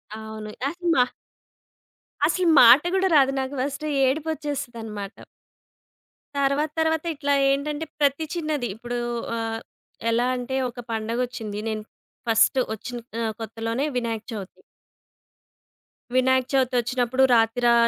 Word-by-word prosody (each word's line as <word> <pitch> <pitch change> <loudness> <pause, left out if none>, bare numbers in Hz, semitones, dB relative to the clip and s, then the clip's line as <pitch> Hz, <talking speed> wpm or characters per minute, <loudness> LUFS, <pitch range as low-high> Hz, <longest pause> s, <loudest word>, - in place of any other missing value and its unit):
అవును. 220 -1 -7 0.2
అసలు 350 +3 -3
మా 250 - +6 1.2
అసలు 345 +3 +1
మాట 245 +4 +9
కూడా 380 0 +3
రాదు. 270 -2 +5
నాకు 265 +1 -4
ఫస్ట్ 280 +2 -3 0.2
ఏడుపొచ్చేస్తదన్నమాట. 260 -8 -3 1.2
తర్వాత 280 +2 +1
తర్వాత 320 -1 +1
ఇట్లా 285 0 0 0.2
ఏంటంటే 290 +3 -1
ప్రతి 285 +2 +2
చిన్నది, 305 -7 -1
ఇప్పుడు 240 +2 -5 0.4
ఆహ్, 225 0 -2 0.5
ఎలా 240 +2 +2
అంటే 250 +1 -3
ఒక 245 +1 -11
పండగొచ్చింది. 225 -1 -3
నేను 215 -1 -3 0.5
ఫస్టు 225 +3 +4
వచ్చిన 245 +3 -6 0.2
ఆహ్, 220 -1 -1
కొత్తలోనే 225 +4 -2
వినాయక 230 -2 -2
చవితి. 200 -3 -8 1.5
వినాయక 260 0 +3
చవితి 260 -2 +2
ఒచ్చినప్పుడు 250 +2 +1
రాతిరా 235 +1 +4
250 Hz, 110 wpm, -24 LUFS, 225-285 Hz, 1.5 s, మాట